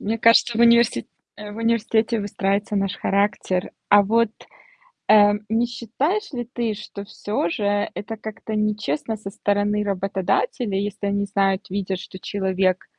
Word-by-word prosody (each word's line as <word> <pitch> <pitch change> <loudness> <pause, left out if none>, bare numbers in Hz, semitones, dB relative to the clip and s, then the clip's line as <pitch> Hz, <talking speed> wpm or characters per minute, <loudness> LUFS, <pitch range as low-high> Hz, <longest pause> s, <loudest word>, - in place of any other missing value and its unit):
Мне 225 +2 -2
кажется, 230 0 +4
в - - +2
универси 235 - +4 0.3
э, 210 0 -8
в - - -10
университете 230 0 +1
выстраивается 200 +1 -1
наш 195 -1 -1
характер. 200 -2 0 0.2
А 205 0 +7
вот, 225 +2 +2 0.8
э, 205 -1 +7 0.2
не 225 +2 +2
считаешь 290 - -2
ли 240 -2 -4
ты, 230 -3 -1
что 200 -1 -8
всё 205 -3 -2
же 205 +2 0
это 225 +2 -6
как-то 220 0 -6
нечестно 210 -2 -1
со 200 -1 -7
стороны 205 0 0
работодателя. 195 +3 -1
Если 200 0 -3
они 200 0 0
знают, 195 -1 0
видят, 190 -1 -2
что 185 - -9
человек 190 -2 0
205 Hz, 150 wpm, -22 LUFS, 195-225 Hz, 0.8 s, А